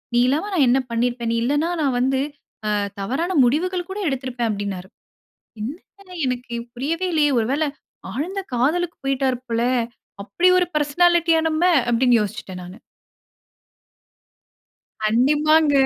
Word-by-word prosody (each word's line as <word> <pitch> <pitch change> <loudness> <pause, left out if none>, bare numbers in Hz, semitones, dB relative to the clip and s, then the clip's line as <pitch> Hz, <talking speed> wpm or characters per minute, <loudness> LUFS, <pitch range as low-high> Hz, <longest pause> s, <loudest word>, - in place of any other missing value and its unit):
நீ 240 - +5
இல்லாம 310 +10 0
நான் 300 -7 +4
என்ன 260 - +4
பண்ணியிருப்பேன்? 235 0 -1
நீ 230 - 0
இல்லன்னா, 290 +6 +1
நான் 275 -4 +1
வந்து 265 +1 +1 0.5
அ - - +1 0.3
தவறான 280 - -1
முடிவுகள் 350 +8 0
கூட 390 - -5
எடுத்திருப்பேன்" 255 -3 -2
அப்படின்னாரு. 200 -2 -4 0.7
"என்ன 365 - -9
எனக்கு 250 -1 -3 0.2
புரியவே 320 +9 -2
இல்லையே, 295 -2 +3
ஒரு 220 - 0
வேள 300 +3 +1 0.5
ஆழ்ந்த 340 - -3
காதலுக்கு 325 +8 0
போய்ட்டாரு 270 -2 0
போல. 230 0 0 0.6
அப்படி 345 - +2
ஒரு 360 - +1
பெர்சனாலிட்டியா 330 +2 +3
நம்ம!" 310 +1 -1 0.3
அப்படின்னு 240 0 +4
யோசிச்சுட்டேன் 190 -2 -6
நானு. 180 +3 -10 2.3
கண்டிப்பாங்க. 295 +7 +3
270 Hz, 125 wpm, -22 LUFS, 240-325 Hz, 2.3 s, நீ